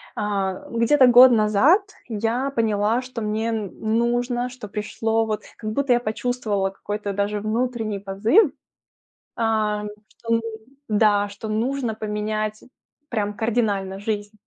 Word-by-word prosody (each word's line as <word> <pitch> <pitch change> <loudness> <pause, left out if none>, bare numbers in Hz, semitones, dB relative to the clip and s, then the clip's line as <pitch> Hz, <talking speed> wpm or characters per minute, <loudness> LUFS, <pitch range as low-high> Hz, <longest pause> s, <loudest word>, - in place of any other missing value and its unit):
А 195 -3 -2
где-то 250 +3 +4
год 250 +1 +9
назад 225 - +4 0.3
я 230 +5 -1
поняла, 220 0 +1
что 250 -2 -7
мне 220 +2 -1
нужно, 235 +4 -1
что 245 -4 -9
пришло 225 +2 -1
вот 215 -1 -3
как 215 -1 -4
будто 270 +1 +2
я 240 - +3
почувствовала 215 -4 -1
какой-то 205 +1 -5
даже 205 +1 -1
внутренний 220 -1 -2
позыв. 220 - +3 0.8
Ам, 215 -2 0 0.3
что 230 - -10
нужно, 230 0 0 0.4
да, 205 -1 +3
что 205 +2 -8
нужно 235 +2 -1
поменять 215 0 -3 0.5
прям 210 -3 -2
кардинально 205 -4 -1
жизнь. 205 0 -4
220 Hz, 125 wpm, -23 LUFS, 210-240 Hz, 0.8 s, год